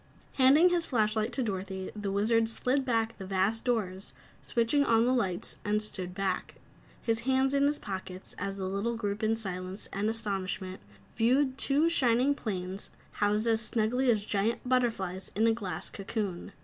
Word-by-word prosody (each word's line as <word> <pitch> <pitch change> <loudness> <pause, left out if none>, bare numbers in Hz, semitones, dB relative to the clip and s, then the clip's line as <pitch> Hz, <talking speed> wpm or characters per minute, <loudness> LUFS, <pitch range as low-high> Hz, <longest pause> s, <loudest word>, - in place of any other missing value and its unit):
Handing 285 +7 +6
his 350 -1 0
flashlight 220 -1 +1
to 265 - 0
Dorothy, 190 -3 -4
the 205 -2 -3
Wizard 225 +3 +2
slid 255 +4 +1
back 230 -2 0
the 190 - -6
vast 195 +4 +1
doors, 200 -6 -1 0.3
switched 230 +1 0
on 235 -6 +4
the 250 - +3
lights 195 -8 0
and 210 +1 +1
stood 185 -4 -2
back, 195 -2 -2 0.5
his 225 -1 +1
hands 265 +2 +1
in 280 0 +4
his 295 +1 +1
pockets, 190 -2 -7
as 195 +1 -3
the 190 - -3
little 200 +5 -1
group 205 -2 -3
in 220 0 +2
silence 185 -3 -4
and 205 +2 0
astonishment 195 -4 -3 0.3
viewed 260 +4 +3
the - - -17
two 290 +4 +3
shining 260 -3 +3
planes 190 -6 -5 0.3
housed 210 +2 +2
as 225 -1 +2
snugly 240 +3 +1
as 215 -3 +2
giant 215 +4 -1
butterflys 225 -8 0
in 220 +3 +3
a 225 - +4
glass 185 -7 -4
cocoon. 200 -3 -4
220 Hz, 170 wpm, -30 LUFS, 195-245 Hz, 0.5 s, Handing